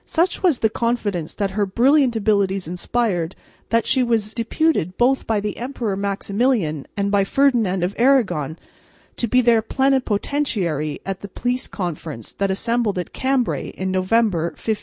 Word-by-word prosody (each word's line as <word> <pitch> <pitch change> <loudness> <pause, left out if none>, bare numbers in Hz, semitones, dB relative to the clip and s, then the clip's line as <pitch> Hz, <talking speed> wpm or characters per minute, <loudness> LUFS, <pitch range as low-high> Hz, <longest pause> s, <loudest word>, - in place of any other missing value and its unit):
Such 345 +2 0
was 350 -8 +3
the 220 - +2
confidence 210 -9 -1
that 200 -2 -1
her 205 +1 0
brilliant 255 +4 +3
abilities 200 -4 +1
inspired 180 -1 -1 0.3
that 230 0 +2
she 260 - +2
was 225 -3 0
deputed 230 - 0
both 260 +2 +2
by 220 -2 +1
the 210 0 -4
Emperor 240 -5 -3
Maximilian 200 - -1
and 200 0 0
by 200 -1 +3
Ferdinand 220 -6 +2
of 180 +3 -1
Aragon 220 - +2 0.6
to 235 - 0
be 250 +3 +4
their 235 -2 +4
plenipotentiary 220 - 0
at 195 -1 -4
the 200 - -6
Peace 245 +6 -2
Congress 160 - -5
that 200 0 -1
assembled 230 +1 0
at 180 - -4
Cambray 260 -2 0
in 190 0 -2
November, 185 -2 +2
1508. 220 -2 -2
215 Hz, 155 wpm, -21 LUFS, 190-245 Hz, 0.6 s, be